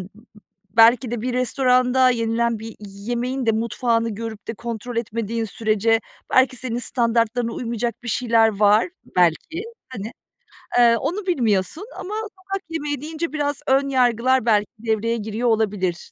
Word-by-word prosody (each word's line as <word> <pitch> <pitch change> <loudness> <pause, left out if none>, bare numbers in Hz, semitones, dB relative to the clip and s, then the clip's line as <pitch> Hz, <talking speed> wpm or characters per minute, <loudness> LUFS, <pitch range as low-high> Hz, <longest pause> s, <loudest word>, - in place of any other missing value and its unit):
ı 180 - -11 0.7
belki 235 +1 +6
de 240 -2 -3
bir 250 +2 -2
restoranda 255 0 +3
yenilen 230 -1 0
bir 225 +1 -9
yemeğin 240 +6 -4
de 225 - +4
mutfağını 230 +1 0
görüp 220 0 -7
de 225 - -3
kontrol 235 +1 -6
etmediğin 230 0 -2
sürece 225 0 +1 0.3
belki 260 0 +4
senin 240 -1 -3
standartlarına 235 -1 0
uymayacak 235 -1 -3
bir 245 - -7
şeyler 230 -1 +3
var, 210 - +5 0.3
belki, 180 - +2 0.3
hani, 225 -4 -6 0.7
eee, 235 -1 +6
onu 360 +9 -3
bilmiyorsun. 245 - 0
Ama 395 - -6 0.2
sokak 390 +1 -5
yemeği 295 -4 -3
deyince 315 +1 -4
biraz 290 -2 -1
ön 275 +1 +3
yargılar 255 -1 +2
belki 210 -3 +3
devreye 225 +1 0
giriyor 220 +2 -1
olabilir, 200 -6 -1
235 Hz, 140 wpm, -22 LUFS, 225-255 Hz, 0.7 s, belki